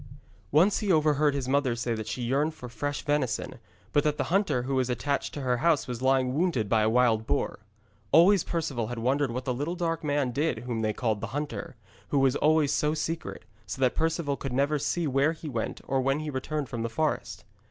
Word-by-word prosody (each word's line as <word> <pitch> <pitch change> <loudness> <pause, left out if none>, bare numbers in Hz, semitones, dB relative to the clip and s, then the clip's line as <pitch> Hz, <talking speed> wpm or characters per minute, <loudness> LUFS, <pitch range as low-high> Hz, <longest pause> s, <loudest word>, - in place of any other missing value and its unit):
Once 175 +8 +4
he 210 -3 0
overheard 150 -2 +3
his 135 -3 -2
mother 135 -2 +1
say 120 0 -2
that 110 -1 -5
she 125 - -3
yearned 145 +6 0
for 125 - -9
fresh 145 +5 -4
venison, 145 -5 -1 0.3
but 145 - +4
that 150 -1 0
the - - 0
hunter 190 -11 +2
who 135 +2 -3
was 130 -1 +1
attached 140 +4 -1
to 145 - -6
her 125 -2 +1
house 160 +1 +2
was 125 -1 -5
lying 130 -1 +2
wounded 150 - +1
by 110 +1 +3
a 110 - +3
wild 115 -2 +2
boar. - - -1 0.5
Always 180 +4 +6
Perceval 140 -9 -2
had 120 - -5
wondered 135 +4 +1
what 125 +2 -4
the 125 - 0
little 145 +8 -3
dark 165 -2 -2
man 145 -3 0
did 150 +4 -1
whom 120 -3 -2
they 110 -1 +1
called 110 -2 -1
the - - -3
hunter, 145 -3 -5 0.3
who 140 - 0
was 135 -1 +3
always 155 -1 +3
so 150 +1 +1
secret, 165 +2 -4 0.2
so 90 - -5
that 130 -2 +3
Perceval 160 -3 0
could 135 -2 -5
never 140 +3 +1
see 165 +4 -1
where 140 +3 +2
he 160 -1 -9
went 115 -6 -3
or 135 -1 +1
when 135 +3 +1
he 155 -1 -4
returned 145 +2 -3
from 120 -1 -5
the 115 - -2
forest. 155 +6 -2
140 Hz, 220 wpm, -28 LUFS, 125-155 Hz, 0.5 s, Always